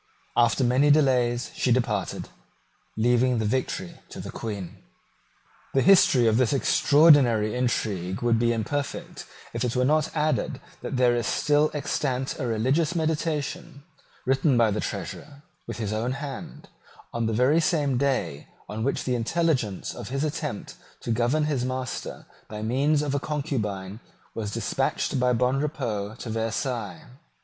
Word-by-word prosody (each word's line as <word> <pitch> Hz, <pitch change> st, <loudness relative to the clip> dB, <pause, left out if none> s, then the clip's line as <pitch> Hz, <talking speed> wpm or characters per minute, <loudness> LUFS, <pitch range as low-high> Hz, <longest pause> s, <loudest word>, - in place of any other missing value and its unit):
After 120 Hz, +2 st, +3 dB
many 130 Hz, +4 st, +3 dB
delays 125 Hz, -5 st, +3 dB
she 125 Hz, -, 0 dB
departed, 115 Hz, -6 st, 0 dB, 0.7 s
leaving 120 Hz, +2 st, +3 dB
the 110 Hz, -, 0 dB
victory 105 Hz, -6 st, -2 dB
to -, -, -9 dB
the -, -, -6 dB
Queen. 100 Hz, -6 st, -6 dB, 1.0 s
The 135 Hz, -, +4 dB
history 180 Hz, -10 st, +6 dB
of 110 Hz, -1 st, +3 dB
this 130 Hz, +1 st, +2 dB
extraordinary 135 Hz, -6 st, +4 dB
intrigue 105 Hz, -6 st, -1 dB
would 115 Hz, -1 st, +3 dB
be 120 Hz, 0 st, +2 dB
imperfect, 130 Hz, +6 st, -4 dB, 0.3 s
if 115 Hz, +1 st, -2 dB
it 125 Hz, 0 st, -1 dB
were 125 Hz, 0 st, +2 dB
not 155 Hz, +2 st, +2 dB
added 155 Hz, -3 st, 0 dB, 0.2 s
that -, -, -4 dB
there 125 Hz, -1 st, +4 dB
is 120 Hz, -3 st, -1 dB
still 150 Hz, 0 st, +2 dB
extant 135 Hz, -2 st, -2 dB
a 130 Hz, -, -2 dB
religious 135 Hz, +9 st, +1 dB
meditation, 155 Hz, -3 st, -2 dB, 0.4 s
written 135 Hz, 0 st, +2 dB
by 115 Hz, -2 st, +4 dB
the 105 Hz, -, -1 dB
Treasurer, 145 Hz, 0 st, -6 dB, 0.2 s
with -, -, -5 dB
his 110 Hz, -2 st, -3 dB
own 115 Hz, +4 st, -1 dB
hand, 135 Hz, -, -7 dB, 0.4 s
on 115 Hz, -1 st, -1 dB
the -, -, 0 dB
very 125 Hz, +8 st, +3 dB
same 145 Hz, -6 st, +1 dB
day 125 Hz, -, -1 dB, 0.2 s
on 110 Hz, +1 st, -4 dB
which 140 Hz, -, -1 dB
the 125 Hz, -, -1 dB
intelligence 125 Hz, -, 0 dB
of -, -, -8 dB
his 135 Hz, +2 st, -1 dB
attempt 150 Hz, -6 st, -4 dB, 0.2 s
to 115 Hz, -, -3 dB
govern 120 Hz, +7 st, +1 dB
his 145 Hz, -5 st, 0 dB
master 130 Hz, 0 st, -4 dB, 0.2 s
by 105 Hz, 0 st, -6 dB
means 140 Hz, +6 st, +2 dB
of 145 Hz, -2 st, -2 dB
a 140 Hz, -, +1 dB
concubine 110 Hz, -10 st, -3 dB, 0.3 s
was 110 Hz, -2 st, -4 dB
despatched 115 Hz, -, -1 dB
by 125 Hz, 0 st, +3 dB
Bonrepaux 125 Hz, -4 st, -1 dB
to 115 Hz, -, -6 dB
Versailles. 115 Hz, 0 st, -3 dB
125 Hz, 150 wpm, -26 LUFS, 115-145 Hz, 1.0 s, history